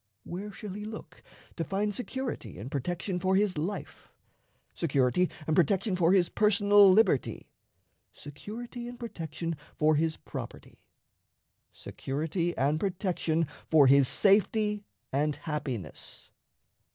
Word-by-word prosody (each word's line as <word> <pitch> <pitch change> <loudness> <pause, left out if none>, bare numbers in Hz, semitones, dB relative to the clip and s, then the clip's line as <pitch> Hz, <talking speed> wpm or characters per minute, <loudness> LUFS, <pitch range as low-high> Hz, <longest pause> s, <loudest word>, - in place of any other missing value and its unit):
Where 200 +4 -6
shall 205 0 -8
he 210 +1 -6
look 220 +1 -9 0.4
to 165 - -1
find 200 +5 -1
security 250 - -5
and 115 +8 -7
protection 175 +6 -2
for 190 +2 +1
his 200 -1 +2
life, 170 +7 -5 0.6
security 140 +2 +1 0.2
and 155 - +1
protection 190 +4 +2
for 175 -1 +3
his 185 -3 +4
personal 205 -1 +5
liberty, 185 - +2 0.6
security 235 - -8
and 245 0 -8
protection 165 - -5 0.2
for 155 0 +3
his 160 +1 0
property, - - -9 0.9
security 160 +5 -3
and 145 +4 +1
protection 175 -4 0 0.2
for 155 -3 +6
his 135 0 +6
safety 210 - +3 0.3
and 145 +2 +1
happiness? 130 - -6
180 Hz, 115 wpm, -29 LUFS, 150-205 Hz, 0.9 s, for